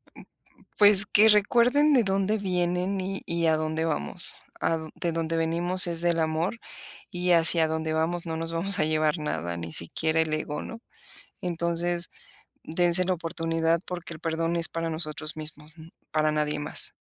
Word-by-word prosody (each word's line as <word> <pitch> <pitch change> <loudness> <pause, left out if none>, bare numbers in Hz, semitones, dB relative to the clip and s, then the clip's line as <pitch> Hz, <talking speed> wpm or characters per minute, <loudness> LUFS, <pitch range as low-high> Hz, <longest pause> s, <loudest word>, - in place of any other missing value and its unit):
Mm - - -13
mm, - - -25 0.4
pues, 205 -1 +8
que 215 +1 +4
recuerden 245 +8 +3
de 250 -4 +4
dónde 195 +2 -1
vienen, 180 0 -2
y 195 +1 -5
y 170 0 -2
a 160 - +3
dónde 155 +1 -2
vamos, 75 - +4 0.2
a 165 - 0
d 160 0 -9
de 170 - -3
dónde 165 0 -3
venimos 175 +3 +2
es 170 -1 -3
del 170 -1 0
amor, 160 +8 -2 0.5
y 180 -2 -2
hacia 165 -1 +5
dónde 160 0 -3
vamos 165 +2 -2
no 160 -1 -4
nos 165 0 -3
vamos 180 +4 0
a 155 - +2
llevar 155 +1 0
nada, 85 - -4
ni 85 -1 -7
siquiera 160 - 0
el 160 -1 -2
ego, 150 -1 -4
¿no? 230 - -9 0.6
Entonces, 170 0 -2 0.5
dense 175 +2 +2
la 185 0 0
oportunidad 165 -1 -2
porque 175 -2 -7
el 155 - -13
perdón 165 +1 -2
es 165 -1 +3
para 165 0 -4
nosotros 155 -1 -4
mismos, 155 0 -9
n 160 +1 -13 0.2
para 155 0 0
nadie 150 0 -1
más. 150 - -6
165 Hz, 180 wpm, -25 LUFS, 160-180 Hz, 0.6 s, pues